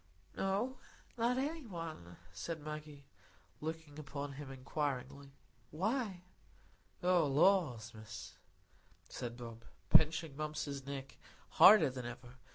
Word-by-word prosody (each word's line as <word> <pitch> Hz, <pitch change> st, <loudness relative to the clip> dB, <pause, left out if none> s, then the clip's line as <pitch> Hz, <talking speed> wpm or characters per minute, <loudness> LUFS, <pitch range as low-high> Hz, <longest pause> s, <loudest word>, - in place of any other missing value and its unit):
"No, 210 Hz, +7 st, 0 dB, 0.4 s
not 240 Hz, +1 st, +2 dB
any 290 Hz, +1 st, -2 dB
one," 160 Hz, -, -7 dB, 0.2 s
said 160 Hz, -, -4 dB
Maggie, 150 Hz, -1 st, -7 dB, 0.5 s
looking 160 Hz, -1 st, -5 dB
up 145 Hz, -1 st, -11 dB
at 140 Hz, 0 st, -2 dB
him 140 Hz, 0 st, -8 dB
inquiringly. 135 Hz, 0 st, -3 dB, 0.4 s
"Why?" 200 Hz, -, -1 dB, 0.8 s
"Oh, 175 Hz, -3 st, +4 dB
lors, 140 Hz, -, +3 dB
Miss," 110 Hz, -1 st, -9 dB, 0.8 s
said 120 Hz, -1 st, -5 dB
Bob, 115 Hz, -1 st, -8 dB, 0.3 s
pinching 155 Hz, -1 st, +5 dB
Mumps's 145 Hz, -2 st, -4 dB
neck 135 Hz, -1 st, -6 dB, 0.3 s
harder 190 Hz, -9 st, +8 dB
than 125 Hz, -2 st, -5 dB
ever. 120 Hz, +1 st, -9 dB
150 Hz, 110 wpm, -36 LUFS, 130-175 Hz, 0.8 s, harder